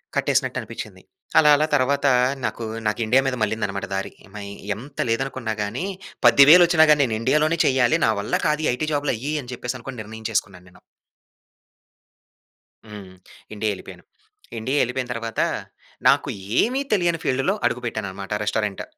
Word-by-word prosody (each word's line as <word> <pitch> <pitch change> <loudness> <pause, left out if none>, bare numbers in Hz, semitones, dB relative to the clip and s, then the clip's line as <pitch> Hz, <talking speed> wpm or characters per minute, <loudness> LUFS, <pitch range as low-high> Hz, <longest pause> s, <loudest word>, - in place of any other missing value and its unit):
కట్టేసినట్టు - - 0
అనిపిచ్చింది. - - -9 0.4
అలా, 150 - +5
అలా 155 - +2
తర్వాత 140 +1 +1 0.4
నాకు, 115 - -4 0.2
నాకు 105 +2 -1
ఇండియా 125 +5 +4
మీద 130 - -1
మల్లిందన్నమాట 100 -2 -2
దారి. 95 - -3 0.2
మయి 100 -1 -7 0.2
ఎంత 135 +6 -12
లేదనుకున్నా 120 -1 -2
గాని, 110 - -4 0.4
10,000 140 +9 +8
వచ్చినా 160 -2 +5
గాని, 150 -1 +4
నేను 110 -3 -2
ఇండియాలోనే 155 +6 +2
చేయాలి. 130 -3 +3
నా - - +3
వల్ల 105 - -2
కాదు 150 0 0
ఐటీ 155 +5 -3
జాబ్‌లు 145 0 0
అయ్యి 140 +7 -4
అని 125 -1 -10
చెప్పేసి, 125 +1 -5
అనుకోని 125 -1 -7
నిర్ణయించేసుకున్నాను 105 -4 -4
నేను. - - -20 2.1
హ్మ్, 100 -3 -10 0.4
ఇండియా 105 0 -1
ఎళ్ళిపోయాను. - - -12 0.5
ఇండియా 130 +6 -1
ఎళ్ళిపోయిన 125 +1 -3
తర్వాత 115 -1 -3 0.7
నాకు - - +3 0.3
ఏమి 255 +4 0
తెలియని 175 -5 +1
ఫీల్డ్‌లో 135 +9 +1
అడుగుపెట్టానన్నమాట 105 -5 -3
రెస్టారెంట్. 105 -1 -2
125 Hz, 140 wpm, -22 LUFS, 110-145 Hz, 2.1 s, 10,000